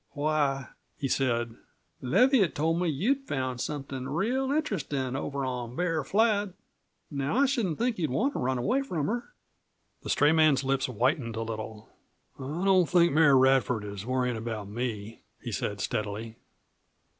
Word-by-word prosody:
"Why," 145 -3 0 0.3
he 140 - -2
said, 120 -4 0 0.4
"Leviatt 225 - +3
told 165 +3 +1
me 180 - +1
that 150 - -1
you'd 270 - 0
found 130 -2 -2
somethin' 135 -3 -4
real 245 - 0
interestin' 150 - -1
over 140 0 -3
on 125 -2 -4
Bear 165 -2 0
Flat. 205 +1 +2 0.6
Now, 140 - -1
I 280 - +5
shouldn't 230 - 0
think 235 -3 0
you'd 155 -4 0
want 250 - 0
to - - -3
run 130 +1 0
away 240 - +1
from 175 - -2
her!" 240 - -3 0.7
The - - -7
stray 145 +1 +4
man's 155 -4 +4
lips 135 0 0
whitened 125 0 0
a 115 - -2
little. 110 -1 -6 0.5
"I 145 +7 -4
don't 185 -3 +4
think 170 -4 +4
Mary 150 -3 +6
Radford 130 -4 +3
is 100 -1 -6
worryin' 125 0 0
about 110 -2 -5
me," 110 -1 -5 0.2
he 120 - -6
said 100 0 -3
steadily. 110 +1 -3
140 Hz, 160 wpm, -28 LUFS, 125-180 Hz, 0.7 s, Mary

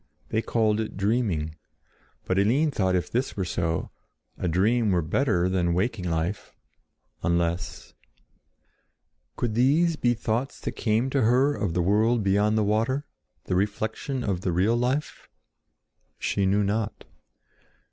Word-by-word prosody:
They 110 - 0
called 110 -2 +1
it 110 -3 -4
dreaming; 100 -7 0 0.7
but 95 +1 +1
Eline 135 +10 +3
thought 95 -7 +1
that - - +3
if 90 - -4
this 125 -1 -1
were 95 - -1
so, 85 -2 -2 0.4
a - - -3
dream 105 +7 +2
were 90 -3 +2
better 90 - +1
than 95 -2 +1
a - - +1
waking 95 0 -1
life—unless— 85 0 -4 1.4
Could 120 -3 -2
these 150 +8 +3
be 120 -3 +2
thoughts 115 +4 -2
that - - -3
came 115 +4 0
to 135 - +2
her 130 +6 +3
of 100 -11 -2
the 90 - +2
world 110 +4 +2
beyond 105 +2 +2
the 110 - +3
water, 115 +7 0 0.4
the - - -2
reflection 110 +6 -2
of 95 -5 -1
the 95 - -1
real 95 +7 +2
life? 130 +5 -2 0.9
She 100 -1 0
knew 100 +2 +2
not. 105 +2 -2
105 Hz, 145 wpm, -26 LUFS, 90-120 Hz, 1.4 s, Eline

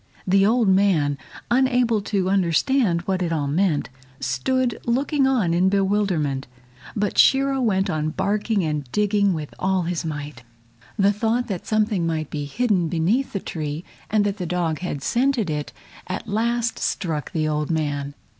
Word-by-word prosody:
The 195 +1 +4
old 230 0 +3
man, 185 -7 +3 0.4
unable 245 -3 +3
to 195 -2 -1
understand 190 - +2
what 190 +1 -2
it 170 -2 -1
all 155 -3 0
meant, 155 +1 +1 0.3
stood 235 - 0
looking 270 +3 +2
on 225 -11 +2
in 180 +2 +3
bewilderment. 190 -9 0 0.5
But 205 -1 -1
Shiro 270 0 +4
went 195 -4 +1
on 155 -4 -1
barking 200 +3 0
and 150 -5 -3
digging 205 -1 +2
with 150 -2 -6
all 190 -1 +1
his 170 0 -2
might. 150 -5 -6 0.6
The 200 0 +4
thought 225 +4 0
that 185 -4 -4
something 210 -5 +1
might 155 -2 -2
be 145 -1 -3
hidden 195 - +1
beneath 180 - 0
the 200 - -1
tree, 155 -2 -5 0.3
and 210 -1 +2
that 200 0 -1
the 180 -3 -4
dog 165 -3 -1
had 145 -6 -4
scented 240 - +1
it, 150 -1 -3 0.4
at 185 +4 -5
last 230 +2 0
struck 160 -6 -2
the 155 -2 0
old 150 -1 -1
man. 145 -3 -2
190 Hz, 160 wpm, -23 LUFS, 155-220 Hz, 0.6 s, The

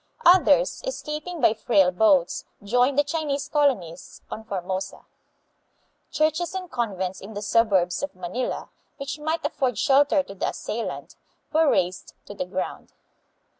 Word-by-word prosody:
Others, 375 +8 +5
escaping 335 -6 -5
by 220 - +5
frail 200 -4 +3
boats, 185 -2 +3 0.2
joined 245 +6 +2
the 290 - +5
Chinese 290 -2 -2
colonists 230 - -1
on 220 - -6
Formosa. 190 -2 -4 1.0
Churches 315 +4 0
and 365 -2 -5
convents 190 -7 -2
in 205 +2 -10
the 205 - -4
sub 230 +2 +3
urbs 180 -3 +1
of 285 -7 -4
Manila, 185 +8 -4 0.3
which 280 +2 -5
might 315 +1 -2
afford 260 - -1
shelter 280 +4 +4
to 195 - -10
the 195 - -2
assailant, 230 +1 -5 0.4
were 315 -1 +4
razed 180 -4 -1
to - - -9
the - - -4
ground. - - -5
250 Hz, 140 wpm, -25 LUFS, 195-300 Hz, 1.0 s, Others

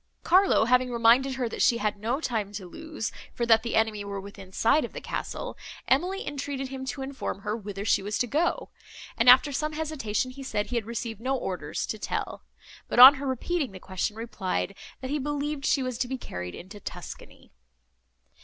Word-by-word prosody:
Carlo 375 - +5
having 250 +1 +3
reminded 240 +3 +4
her, 255 -2 -1
that - - -5
she 235 - +4
had 210 -2 -1
no 235 +6 -1
time 220 -9 -2
to 200 -2 -6
lose, 315 - -5 0.2
for 235 - 0
that 225 -1 +5
the 235 0 -3
enemy 220 -2 +1
were 200 -1 -5
within 195 -1 -11
sight 230 +10 +3
of - - -6
the - - -5
castle, - - -5 0.3
Emily 360 +9 +1
entreated 275 -1 -4
him 265 0 -6
to 265 +1 -4
inform 265 -7 -5
her 210 - -2
whither 205 -2 -6
she 205 - +3
was 205 +2 -2
to - - +1
go; 310 +8 0 0.5
and, 230 +1 +5
after 265 +4 +7
some 305 +2 -2
hesitation, 275 -7 -2
he 275 +2 -10
said 210 -6 -2
he - - -2
had 225 -2 -1
received 230 -2 -4
no 265 +2 0
orders 180 -9 -3
to 215 - -5
tell; - - -3 0.5
but, - - -3
on 255 +3 +12
her 280 - -3
repeating 270 - -1
the 185 - -9
question, 190 +3 -3
replied, 215 -4 -3 0.3
that 260 0 -5
he 295 - 0
believed 290 0 -2
she 270 - +2
was 255 -2 -4
to 255 - 0
be 260 +1 -3
carried 90 - -6
into 195 +4 -10
Tuscany. - - -9
240 Hz, 200 wpm, -27 LUFS, 210-270 Hz, 0.5 s, on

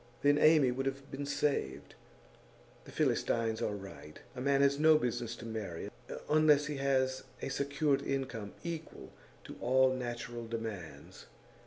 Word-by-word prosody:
Then 145 +1 +5
Amy 155 -5 +6
would 135 +2 -2
have 135 +1 -5
been 140 0 -4
saved. 145 - -1 0.9
The - - -11
Philistines 115 -1 0
are 105 - -1
right: 95 -6 -10 0.2
a 125 - -5
man 140 +1 +3
has 140 0 +3
no 155 0 +7
business 120 -4 -2
to 115 - -10
marry 105 -7 -5 0.4
unless 150 -1 +5
he 145 -1 -4
has 130 -1 +1 0.2
a - - -2
secured 140 +1 +1
income 125 -7 -3
equal 165 -2 -6 0.3
to - - -10
all 130 +1 +4
natural 120 -2 -5
demands. 110 -7 -7
130 Hz, 145 wpm, -33 LUFS, 115-140 Hz, 0.9 s, no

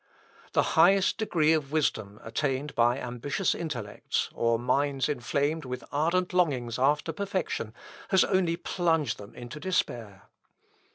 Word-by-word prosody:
The - - +4
highest 190 +6 +4
degree 160 -7 +3
of 150 -3 -1
wisdom 110 -9 -1
attained 135 +4 -2
by 120 +1 +3
ambitious 130 +8 -1
intellects, 125 -11 -3
or 115 0 +1
minds 135 +3 +1
inflamed 145 +3 -1
with 125 -1 -5
ardent 170 +5 +1
longings 130 -10 +1
after 150 +4 +2
perfection, 190 - -2 0.4
has 190 -1 +5
only 180 -3 +1
plunged 160 - 0
them 100 0 -11
into 120 +4 -8
despair. 120 - -2
145 Hz, 125 wpm, -28 LUFS, 120-165 Hz, 0.4 s, has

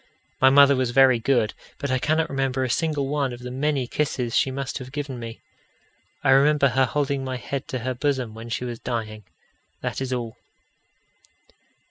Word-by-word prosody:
My 130 - +8
mother 140 +1 +7
was 130 -2 0
very 130 -1 +5
good, 115 -3 +1 0.2
but 140 -2 -3
I 130 - +1
cannot 160 +4 +1
remember 135 -1 -1
a 130 - -1
single 150 -3 0
one 140 -2 0
of 120 - -9
the 125 0 -6
many 140 0 0
kisses 125 -3 -2
she - - +3
must 135 +1 -4
have 130 0 -9
given 140 -3 -5
me. 115 -1 -8 0.8
I 135 - +4
remember 140 +1 +5
her 130 +1 +3
holding 140 0 -1
my 130 -1 -3
head 135 +2 -5
to 130 - -3
her 130 - 0
bosom 130 -3 -1
when 115 +1 -9
she 125 +1 -3
was 120 -2 -5
dying 110 -3 -4 0.6
that - - -3
is 130 -1 -3
all. 120 -3 -3
130 Hz, 185 wpm, -24 LUFS, 125-140 Hz, 0.8 s, My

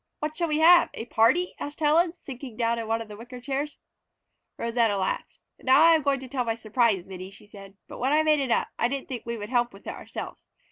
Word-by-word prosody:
"What 305 0 -4
shall 340 +1 0
we 300 -1 0
have? 340 +2 +7
A 225 - -5
party?" 240 +11 +2
asked 290 +1 -6
Helen, 320 +3 +3
sinking 265 -8 -10
down 230 -1 0
in 225 - -5
one 225 +1 -1
of - - -17
the 210 - -9
wicker 240 +3 -10
chairs. 280 +3 -3 0.8
Rosanna 230 -3 +1
laughed. 190 -1 -3 0.2
"Now 270 +4 +5
I 330 0 +7
am 320 - +3
going 280 -1 +1
to 260 - -8
tell 255 -1 -2
my 225 -1 -1
surprise, 220 -4 +1
Minnie," 185 0 -8
she 195 - -15
said. 200 -1 -13
"But - - -10
when 260 +3 +1
I 310 +1 +4
made 305 -1 +3
it 270 -2 -1
up - - +1
I 235 - +3
didn't 275 +2 -4
think 245 -3 -6
we 235 0 -3
would 210 -1 -7
help 240 -1 +1
with 195 - -15
it - - -4
ourselves. - - -8
245 Hz, 245 wpm, -26 LUFS, 225-295 Hz, 0.8 s, have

